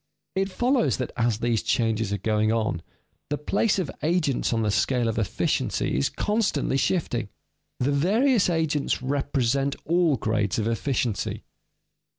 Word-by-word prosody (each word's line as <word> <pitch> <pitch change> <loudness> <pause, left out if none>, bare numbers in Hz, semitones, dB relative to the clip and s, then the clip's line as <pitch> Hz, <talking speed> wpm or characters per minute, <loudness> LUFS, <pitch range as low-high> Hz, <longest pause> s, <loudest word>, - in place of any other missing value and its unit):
_ - - +3
It 195 - -1
follows 245 +5 +1
that 125 - -3
as 115 -2 +1
these 115 -1 0
changes 115 -3 0
are 100 - 0
going 110 +2 +1
on, 110 -7 0 0.5
the 145 - -1
place 200 +8 +1
of 180 -7 -2
agents 155 -4 +1
on 115 -1 +1
the 105 - +1
scale 125 +3 +1
of 115 0 -1
efficiency 105 - -1
is 70 +2 +1
constantly 210 -11 0
shifting. 125 - 0 0.5
The 130 +3 +1
various 205 - +3
agents 155 -5 0
represent 135 0 0
all 170 -2 +3
grades 105 -4 -1
of 110 -1 0
efficiency. 115 -1 -1
135 Hz, 150 wpm, -25 LUFS, 115-165 Hz, 0.5 s, _